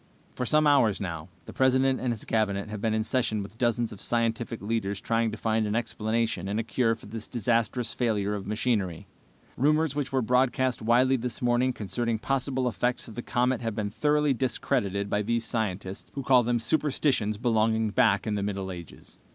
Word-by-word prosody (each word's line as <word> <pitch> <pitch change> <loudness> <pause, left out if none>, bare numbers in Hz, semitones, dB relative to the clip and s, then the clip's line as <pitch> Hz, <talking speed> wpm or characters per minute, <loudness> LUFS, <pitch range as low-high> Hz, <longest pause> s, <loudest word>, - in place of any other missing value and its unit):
"For 125 - -3
some 155 0 +4
hours 130 -9 +4
now, 85 -3 -5 0.2
the - - -9
President 130 0 +3
and 125 -1 -1
his 110 -3 -5
Cabinet 105 -2 0
have 105 -1 -6
been 110 -1 +1
in 110 - +1
session 110 -3 0
with 100 +4 -12
dozens 120 -2 +1
of 100 - -12
scientific 115 -1 -1
leaders 100 -2 -2
trying 115 +1 0
to 110 - -6
find 110 0 0
an 105 - -1
explanation 110 -3 -1
and 105 +2 -1
a - - 0
cure 115 +1 +1
for - - -15
this 110 +1 -7
disastrous 120 0 0
failure 105 -4 0
of 100 -2 -5
machinery. 105 -6 -1 0.5
Rumors 150 +2 +2
which 145 -2 -2
were 130 -2 +1
broadcast 125 +1 +1
widely 125 +4 +3
this 120 0 -4
morning 125 +1 +2
concerning 115 +1 -2
possible 130 +1 -1
effects 120 +2 -1
of 115 - -9
the 120 - -5
comet 125 +1 0
have 115 -3 -3
been 105 -2 -2
thoroughly 150 +3 +2
discredited 115 -6 -1
by 105 +1 0
these 115 +2 -1
scientists, 100 -4 -3
who 140 - -3
call 130 -1 +5
them 120 0 +1
superstitions 130 -4 +1
belonging 110 -1 +1
back 100 -1 +3
in 110 - -1
the 100 - -1
Middle 100 -1 -3
Ages. 85 -2 -11
115 Hz, 190 wpm, -27 LUFS, 105-125 Hz, 0.5 s, call